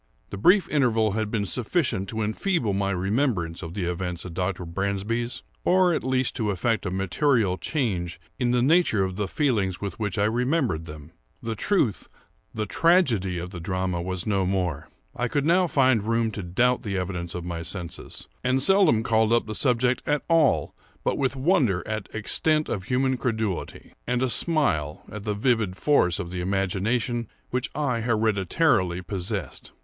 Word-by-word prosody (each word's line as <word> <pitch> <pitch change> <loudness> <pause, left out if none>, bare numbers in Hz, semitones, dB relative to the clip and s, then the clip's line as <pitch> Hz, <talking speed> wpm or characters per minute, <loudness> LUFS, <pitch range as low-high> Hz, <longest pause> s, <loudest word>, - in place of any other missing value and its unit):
The 100 - -5
brief 180 - +5
interval 115 -7 +2
had 110 +1 -2
been 105 -2 -1
sufficient 120 - 0
to 110 -1 -2
enfeeble 110 - 0
my 100 0 0
remembrance 95 - -1
of 85 0 -7
the 100 -4 -2
events 90 0 -3
at 90 - -7
Dr. 90 0 -2
Bransby's, 100 +7 -2 0.2
or 185 -1 +4
at - - -1
least 130 -1 0
to 110 -4 0
effect 100 +1 0
a - - -1
material 95 - +1
change 95 - -2 0.2
in 125 -2 +1
the 120 0 +2
nature 150 - +3
of 95 -1 -3
the 105 0 -2
feelings 105 - 0
with 100 -1 -5
which 105 -3 -2
I 100 - +2
remembered 120 - 0
them. 75 0 -10 0.3
The 115 - -2
truth—the 110 - -2
tragedy—of 100 - +2
the 90 - -7
drama 90 0 -2
was 90 0 -3
no 100 -3 +1
more. 90 -5 -2 0.3
I 125 - -1
could 140 +3 -1
now 180 +3 +4
find 130 -7 +3
room 115 +1 0
to 105 - -5
doubt 120 +8 +1
the 100 -3 -3
evidence 90 -2 -4
of 90 -1 -5
my 85 -1 -4
senses; 85 0 -6 0.2
and 130 +1 +2
seldom 165 - +4
called 110 -1 +2
up 120 0 +3
the 110 - -5
subject 125 0 +1
at 150 0 +1
all 165 -4 +3 0.3
but - - +1
with 135 -1 0
wonder 130 - +1
at 110 -1 -4
extent 155 +8 0
of 95 -4 -3
human 130 +2 +1
credulity, 110 -6 -3
and 125 +1 +1
a 130 - +1
smile 115 - +1
at 105 -1 -7
the 105 -1 -1
vivid 110 -4 +1
force 90 - +3
of 85 - -5
the 90 -1 -3
imagination 100 +5 -1 0.2
which 125 0 -1
I 135 -6 0
hereditarily 110 - +1
possessed. 95 - -4
110 Hz, 170 wpm, -25 LUFS, 95-130 Hz, 0.3 s, brief